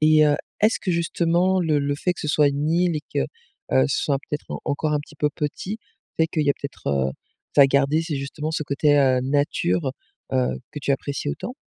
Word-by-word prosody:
Et 155 Hz, 0 st, +6 dB
heu, 145 Hz, -, +3 dB, 0.2 s
est-ce 215 Hz, +3 st, +3 dB
que 185 Hz, -, -1 dB
justement 170 Hz, +2 st, +2 dB
le 155 Hz, -3 st, +2 dB
le 140 Hz, 0 st, 0 dB
fait 180 Hz, +4 st, 0 dB
que -, -, -9 dB
ce 150 Hz, -, -3 dB
soit 150 Hz, -1 st, +4 dB
une 145 Hz, +2 st, -1 dB
île 170 Hz, -1 st, +2 dB
et -, -, -2 dB
que, -, -, +2 dB, 0.5 s
heu, 65 Hz, 0 st, +5 dB
ce -, -, 0 dB
soit 140 Hz, -2 st, +1 dB
peut-être 150 Hz, -, -4 dB
en -, -, -4 dB
encore 150 Hz, +2 st, -1 dB
un 150 Hz, -, +1 dB
petit 150 Hz, +1 st, -15 dB
peu 150 Hz, -, +2 dB
petit, 170 Hz, +9 st, -4 dB, 0.4 s
fait 160 Hz, -, +3 dB
qu'il 155 Hz, -, 0 dB
y 145 Hz, -, +4 dB
a -, -, +2 dB
peut-être, 140 Hz, -, -9 dB
heu, 70 Hz, -1 st, +1 dB, 0.4 s
ça 140 Hz, -, +8 dB
a -, -, +7 dB
gardé 140 Hz, +4 st, +2 dB
ces 160 Hz, -4 st, -3 dB
justement 145 Hz, +3 st, -4 dB
ce 155 Hz, -, -1 dB
côté, 145 Hz, +1 st, +2 dB
heu, 130 Hz, -2 st, +4 dB
nature, 135 Hz, -, 0 dB, 0.4 s
heu, 65 Hz, 0 st, +1 dB
que 150 Hz, -, -5 dB
tu 140 Hz, -, +1 dB
apprécies 140 Hz, -, -3 dB
autant? 245 Hz, -, -5 dB
150 Hz, 230 wpm, -23 LUFS, 140-160 Hz, 0.5 s, ça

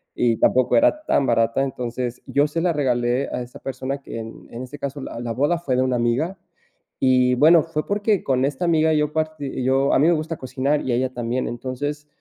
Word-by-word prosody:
y 115 Hz, -2 st, +2 dB
tampoco 130 Hz, -1 st, +3 dB
era 305 Hz, +1 st, +3 dB
tan 140 Hz, -, +2 dB
barata, 115 Hz, +1 st, +2 dB
entonces 125 Hz, -2 st, -4 dB
yo 145 Hz, +1 st, +2 dB
se 165 Hz, +2 st, -3 dB
la 180 Hz, -, +2 dB
regalé 125 Hz, -2 st, 0 dB
a -, -, -2 dB
esa 120 Hz, 0 st, -10 dB
persona, 135 Hz, +1 st, -4 dB
que 115 Hz, -, -7 dB
en 115 Hz, 0 st, -9 dB, 0.2 s
este 140 Hz, +3 st, -9 dB
caso 140 Hz, 0 st, -5 dB
la 125 Hz, -, -7 dB
la 120 Hz, -1 st, -3 dB
boda 145 Hz, +8 st, +1 dB
fue 145 Hz, -7 st, -2 dB
de 130 Hz, -, +2 dB
una 130 Hz, -1 st, +1 dB
amiga, 130 Hz, +11 st, 0 dB, 0.6 s
y 125 Hz, -1 st, +3 dB
bueno, 160 Hz, +5 st, +6 dB
fue 155 Hz, -2 st, -3 dB
porque, 205 Hz, -1 st, +1 dB
con 130 Hz, -1 st, +1 dB
esta 140 Hz, +4 st, -2 dB
amiga 160 Hz, -2 st, +3 dB
yo 150 Hz, -1 st, 0 dB
parti 155 Hz, -4 st, -3 dB
yo 135 Hz, +2 st, +2 dB
a -, -, +4 dB
mí 150 Hz, -, +4 dB
me 175 Hz, -, +5 dB
gusta 160 Hz, 0 st, -3 dB
cocinar 135 Hz, +3 st, -1 dB
y 130 Hz, -, -2 dB
a -, -, +2 dB
ella 130 Hz, +1 st, -1 dB
también, 120 Hz, +1 st, -2 dB
entonces, 145 Hz, +5 st, -4 dB
135 Hz, 215 wpm, -22 LUFS, 125-155 Hz, 0.6 s, bueno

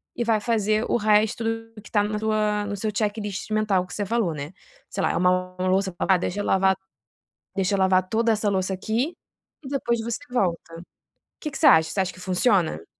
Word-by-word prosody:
e 240 Hz, -, -1 dB
vai 225 Hz, -2 st, +2 dB
fazer 215 Hz, -1 st, +1 dB
o -, -, +3 dB
resto 215 Hz, +1 st, +2 dB, 0.4 s
que -, -, -13 dB
está 205 Hz, -2 st, +2 dB
na 210 Hz, 0 st, -2 dB
tua 210 Hz, -1 st, 0 dB
no 205 Hz, -, -3 dB
seu 210 Hz, +2 st, -2 dB
checklist 210 Hz, 0 st, -2 dB
mental 210 Hz, -4 st, +1 dB
que 180 Hz, -, -11 dB
você 205 Hz, -, -2 dB
falou 215 Hz, -6 st, 0 dB
né? 145 Hz, +2 st, -6 dB, 0.4 s
Sei -, -, -3 dB
lá -, -, +2 dB
é -, -, -3 dB
uma 185 Hz, 0 st, +1 dB
louça, 190 Hz, 0 st, +1 dB
"Ah 190 Hz, -1 st, +3 dB
deixa 180 Hz, +3 st, -3 dB
eu -, -, -2 dB
lavar, 190 Hz, 0 st, +3 dB, 0.8 s
deixa 195 Hz, 0 st, +1 dB
eu 195 Hz, -, -1 dB
lavar 185 Hz, -1 st, +3 dB
toda 230 Hz, +1 st, +2 dB
essa 210 Hz, -1 st, +1 dB
louça 190 Hz, -1 st, 0 dB
aqui", 230 Hz, -, -2 dB, 0.5 s
e -, -, -8 dB
depois 240 Hz, -4 st, -1 dB
você 230 Hz, 0 st, -3 dB
volta. 170 Hz, -6 st, -1 dB, 0.6 s
Que 300 Hz, -, -5 dB
que -, -, -6 dB
você 300 Hz, -, +4 dB
acha? 160 Hz, -10 st, +6 dB
Você 195 Hz, -, -3 dB
acha 190 Hz, -, 0 dB
que 180 Hz, -, -14 dB
funciona? 180 Hz, -, +1 dB
205 Hz, 210 wpm, -24 LUFS, 185-220 Hz, 0.8 s, acha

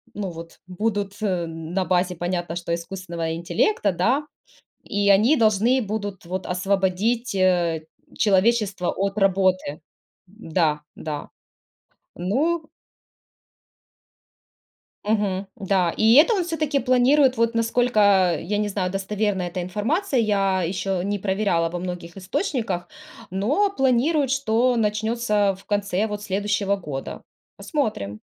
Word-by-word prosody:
ну, 195 Hz, -3 st, -3 dB
вот, 165 Hz, 0 st, -11 dB
будут 200 Hz, +1 st, -2 dB
на 175 Hz, -1 st, -2 dB
базе, 180 Hz, 0 st, +1 dB
понятно, 175 Hz, -1 st, -3 dB
что, 170 Hz, -1 st, -3 dB
искусственного 170 Hz, -2 st, -4 dB
интеллекта, 175 Hz, -, +1 dB
да. 240 Hz, -, +1 dB, 0.6 s
И 205 Hz, 0 st, -1 dB
они 220 Hz, +10 st, +5 dB
должны 225 Hz, +3 st, +3 dB
будут, 205 Hz, -3 st, -4 dB
вот, 185 Hz, +2 st, -4 dB
освободить, 195 Hz, +6 st, 0 dB
э, 175 Hz, -4 st, +1 dB, 0.3 s
человечество 205 Hz, -2 st, +2 dB
от 195 Hz, +1 st, -2 dB
работы. 185 Hz, -5 st, +1 dB, 0.5 s
Да, 165 Hz, -6 st, -1 dB, 0.2 s
да. 150 Hz, -2 st, -5 dB, 0.9 s
Ну 305 Hz, -, 0 dB, 2.4 s
Мгм. 205 Hz, -2 st, 0 dB
Да. 190 Hz, -3 st, +1 dB
И 220 Hz, +1 st, +5 dB
это 305 Hz, -, +7 dB
он, 370 Hz, -, 0 dB
всё-таки, 315 Hz, -4 st, -1 dB
планирует, 255 Hz, +2 st, +4 dB
вот, 230 Hz, 0 st, +1 dB
насколько, 230 Hz, 0 st, +1 dB, 0.4 s
э, -, -, -7 dB
я 205 Hz, +5 st, -2 dB
не 210 Hz, -, 0 dB
знаю, 190 Hz, -2 st, -2 dB
достоверная 195 Hz, -1 st, -1 dB
эта 180 Hz, +1 st, -4 dB
информация, 250 Hz, -, -1 dB
я 195 Hz, -3 st, +1 dB
еще 185 Hz, +1 st, -2 dB
не 205 Hz, +1 st, -1 dB
проверяла 190 Hz, -4 st, 0 dB
во 175 Hz, +2 st, -5 dB
многих 175 Hz, -1 st, -6 dB
источниках, 195 Hz, -, -2 dB, 0.4 s
но, 270 Hz, -, +1 dB
планируют, 270 Hz, -1 st, +2 dB
что 250 Hz, -2 st, +2 dB
начнется 210 Hz, -1 st, +1 dB
в 195 Hz, -, -18 dB
конце, 205 Hz, -1 st, 0 dB
вот, 210 Hz, -1 st, -5 dB
следующего 200 Hz, 0 st, 0 dB
года. 145 Hz, -8 st, -6 dB, 0.3 s
Посмотрим. 105 Hz, -, -3 dB
200 Hz, 120 wpm, -23 LUFS, 180-230 Hz, 2.4 s, это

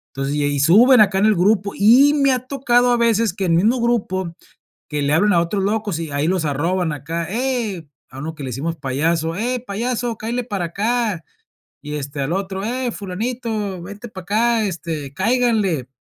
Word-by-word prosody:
Entonces, 135 Hz, +1 st, -2 dB
y 150 Hz, -, 0 dB
ahí 145 Hz, -1 st, 0 dB
suben 220 Hz, -, +6 dB
acá 195 Hz, -2 st, +3 dB
en 200 Hz, -, +3 dB
el 215 Hz, -, +4 dB
grupo 200 Hz, +2 st, +2 dB
y 250 Hz, +8 st, +6 dB
me 275 Hz, -2 st, +3 dB
ha 255 Hz, -, 0 dB
tocado 245 Hz, -3 st, +2 dB
a 240 Hz, -, +3 dB
veces 230 Hz, -2 st, +2 dB
que 195 Hz, 0 st, -3 dB
el 175 Hz, -, +1 dB
mismo 220 Hz, +9 st, +3 dB
grupo, 190 Hz, -7 st, -1 dB, 0.5 s
que 150 Hz, -1 st, -2 dB
le 140 Hz, +1 st, 0 dB
hablen 205 Hz, +6 st, +3 dB
a 170 Hz, -, +4 dB
otros 190 Hz, +3 st, -1 dB
locos 205 Hz, -4 st, -1 dB
y 165 Hz, -2 st, -5 dB
ahí 145 Hz, +3 st, 0 dB
los 185 Hz, -3 st, 0 dB
arroban 165 Hz, +4 st, 0 dB
acá 165 Hz, +4 st, -4 dB
hey, 225 Hz, -, -2 dB, 0.2 s
a 130 Hz, -, -11 dB
uno 160 Hz, +3 st, -5 dB
que 150 Hz, -, -9 dB
le 130 Hz, -, -4 dB
decimos 155 Hz, +7 st, -3 dB
payaso: 160 Hz, +4 st, -1 dB
"Ey, 245 Hz, +4 st, -1 dB
payaso, 235 Hz, +1 st, -3 dB
cáele 240 Hz, +3 st, -3 dB
para 200 Hz, -7 st, -3 dB
acá". 210 Hz, -, -1 dB, 0.6 s
Y 150 Hz, +1 st, -6 dB
este 140 Hz, 0 st, -5 dB
al 135 Hz, +4 st, -1 dB
otro: 195 Hz, 0 st, -3 dB
"Ey, 245 Hz, +2 st, -2 dB
fulanito, 210 Hz, -1 st, -4 dB
vente 205 Hz, +6 st, -9 dB
para 190 Hz, -4 st, -9 dB
acá, 225 Hz, +4 st, +1 dB
este, 160 Hz, -6 st, -5 dB
cáiganle". 210 Hz, -, +1 dB
195 Hz, 195 wpm, -20 LUFS, 165-235 Hz, 0.6 s, suben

